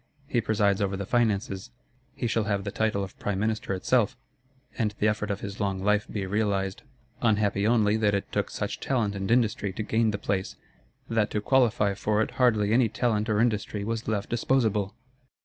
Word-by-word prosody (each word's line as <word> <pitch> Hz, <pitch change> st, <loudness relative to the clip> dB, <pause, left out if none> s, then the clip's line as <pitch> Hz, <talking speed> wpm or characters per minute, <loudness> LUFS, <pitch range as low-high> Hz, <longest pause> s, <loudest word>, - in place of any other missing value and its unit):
He 120 Hz, -3 st, 0 dB
presides 100 Hz, -3 st, +1 dB
over 100 Hz, -1 st, 0 dB
the 100 Hz, -, -4 dB
Finances; 105 Hz, -2 st, 0 dB, 0.5 s
he -, -, -3 dB
shall 115 Hz, -2 st, +1 dB
have 100 Hz, -2 st, -1 dB
the -, -, -4 dB
title 110 Hz, -3 st, 0 dB
of 95 Hz, -, -9 dB
Prime 100 Hz, -2 st, -2 dB
Minister 110 Hz, -1 st, -1 dB
itself, 125 Hz, +5 st, +1 dB, 0.6 s
and 105 Hz, -3 st, -1 dB
the 105 Hz, -, +2 dB
effort 105 Hz, 0 st, -1 dB
of 100 Hz, -1 st, -2 dB
his 100 Hz, 0 st, -6 dB
long 95 Hz, -2 st, -1 dB
life 105 Hz, +1 st, +2 dB
be 100 Hz, -3 st, -2 dB
realised. 100 Hz, -1 st, -1 dB, 0.4 s
Unhappy 105 Hz, -2 st, +2 dB
only 110 Hz, -2 st, +3 dB
that 105 Hz, -2 st, +2 dB
it 100 Hz, -, -3 dB
took -, -, -1 dB
such -, -, -4 dB
talent 115 Hz, -6 st, 0 dB
and 95 Hz, -1 st, -4 dB
industry 110 Hz, -4 st, +2 dB
to 110 Hz, -, -3 dB
gain 110 Hz, +1 st, +1 dB
the 105 Hz, -, -1 dB
place; 100 Hz, -2 st, -2 dB, 0.5 s
that 110 Hz, -2 st, +1 dB
to 105 Hz, -, -1 dB
qualify 110 Hz, -4 st, +2 dB
for 105 Hz, +2 st, 0 dB
it -, -, -5 dB
hardly 110 Hz, -4 st, +3 dB
any 120 Hz, -1 st, +4 dB
talent 110 Hz, -1 st, 0 dB
or 105 Hz, -1 st, +2 dB
industry 105 Hz, -3 st, 0 dB
was 115 Hz, +2 st, -3 dB
left 105 Hz, -2 st, -2 dB
disposable! 110 Hz, -5 st, +1 dB
105 Hz, 190 wpm, -27 LUFS, 100-115 Hz, 0.6 s, any